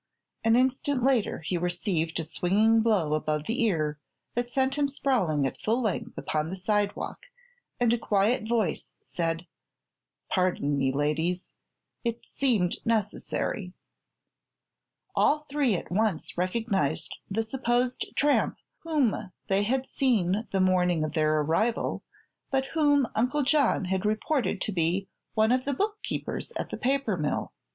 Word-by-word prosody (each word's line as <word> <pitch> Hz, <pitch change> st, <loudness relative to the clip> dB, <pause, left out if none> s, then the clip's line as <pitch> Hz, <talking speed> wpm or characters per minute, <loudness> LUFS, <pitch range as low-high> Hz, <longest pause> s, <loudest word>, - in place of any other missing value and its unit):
An 225 Hz, 0 st, +4 dB
instant 260 Hz, +1 st, +1 dB
later 255 Hz, -9 st, +2 dB
he 175 Hz, 0 st, -1 dB
received 175 Hz, -2 st, -1 dB
a -, -, -1 dB
swinging 210 Hz, +8 st, +3 dB
blow 200 Hz, -9 st, +2 dB
above 155 Hz, 0 st, -1 dB
the 240 Hz, +4 st, -1 dB
ear 155 Hz, -8 st, 0 dB, 0.3 s
that 240 Hz, 0 st, -1 dB
sent 265 Hz, +1 st, +1 dB
him 290 Hz, 0 st, +1 dB
sprawling 225 Hz, -, +1 dB
at 135 Hz, -, -3 dB
full 225 Hz, +3 st, +1 dB
length 215 Hz, -7 st, -2 dB
upon 155 Hz, 0 st, -1 dB
the 185 Hz, -, -4 dB
sidewalk, 205 Hz, -, -2 dB, 0.5 s
and 240 Hz, -1 st, +3 dB
a 240 Hz, -, +1 dB
quiet 215 Hz, +2 st, +1 dB
voice 230 Hz, -4 st, -1 dB
said: 165 Hz, 0 st, -2 dB, 0.8 s
"Pardon 180 Hz, -6 st, +1 dB
me, 135 Hz, -1 st, +1 dB
ladies; 155 Hz, +6 st, -1 dB, 0.5 s
it 235 Hz, -1 st, -3 dB
seemed 220 Hz, -10 st, +1 dB
necessary." 210 Hz, -3 st, -1 dB, 1.4 s
All 300 Hz, 0 st, +3 dB
three 280 Hz, -7 st, +2 dB
at 175 Hz, -, -5 dB
once 205 Hz, -3 st, 0 dB
recognized 185 Hz, -, 0 dB
the 220 Hz, +3 st, 0 dB
supposed 245 Hz, +1 st, -1 dB
tramp 290 Hz, 0 st, +2 dB, 0.2 s
whom 270 Hz, -, 0 dB, 0.2 s
they 195 Hz, +1 st, +3 dB
had 255 Hz, +5 st, 0 dB
seen 215 Hz, -7 st, +1 dB
the 195 Hz, -, +1 dB
morning 180 Hz, -3 st, +3 dB
of 155 Hz, -, -3 dB
their 155 Hz, -1 st, +2 dB
arrival, 190 Hz, +10 st, 0 dB, 0.5 s
but 265 Hz, -1 st, +1 dB
whom 290 Hz, -4 st, +4 dB
Uncle 255 Hz, +6 st, +1 dB
John 275 Hz, -7 st, +3 dB
had 190 Hz, +1 st, -1 dB
reported 215 Hz, 0 st, 0 dB
to -, -, -1 dB
be 185 Hz, +2 st, 0 dB, 0.3 s
one 220 Hz, +1 st, +4 dB
of 255 Hz, 0 st, +2 dB
the 280 Hz, -1 st, 0 dB
bookkeepers 420 Hz, -, -3 dB
at -, -, -4 dB
the -, -, -3 dB
paper 265 Hz, -6 st, 0 dB
mill. 150 Hz, -2 st, -2 dB
215 Hz, 140 wpm, -28 LUFS, 175-250 Hz, 1.4 s, An